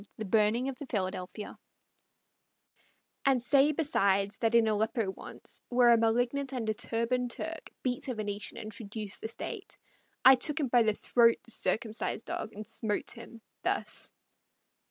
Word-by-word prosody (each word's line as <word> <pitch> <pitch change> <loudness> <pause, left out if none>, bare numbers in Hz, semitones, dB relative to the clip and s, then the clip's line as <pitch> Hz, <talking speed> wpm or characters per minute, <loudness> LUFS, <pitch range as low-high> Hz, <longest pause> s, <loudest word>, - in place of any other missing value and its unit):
THE 220 - -4
BURNING 215 +5 +2
OF 270 -2 -5
THE 285 - -7
"PHILADELPHIA" 185 -1 -4 1.7
And 270 -2 +4
say 275 +4 +4
besides, 200 -10 +2
that 230 0 +1
in 230 -1 +5
Aleppo 220 0 0
once, - - -10
Where 245 -1 +5
a 235 - +7
malignant 245 +4 +1
and 240 -4 -2
a 215 - +2
turban'd 235 +3 -1
Turk 320 +6 -6
Beat 250 0 -1
a 255 - -2
Venetian 205 -1 -4
and 215 - -6
traduced 210 -1 -5
the - - -3
state, 225 - -7 0.5
I 265 - +11
took 275 +4 +1
by 245 - +6
the 220 -1 +3
throat 230 0 +4
the 235 - -10
circumcised 225 0 -1
dog 220 - -4
And 210 +1 -8
smote 210 -2 -2
him, 230 0 -10 0.2
thus. - - -2
230 Hz, 155 wpm, -30 LUFS, 215-250 Hz, 1.7 s, I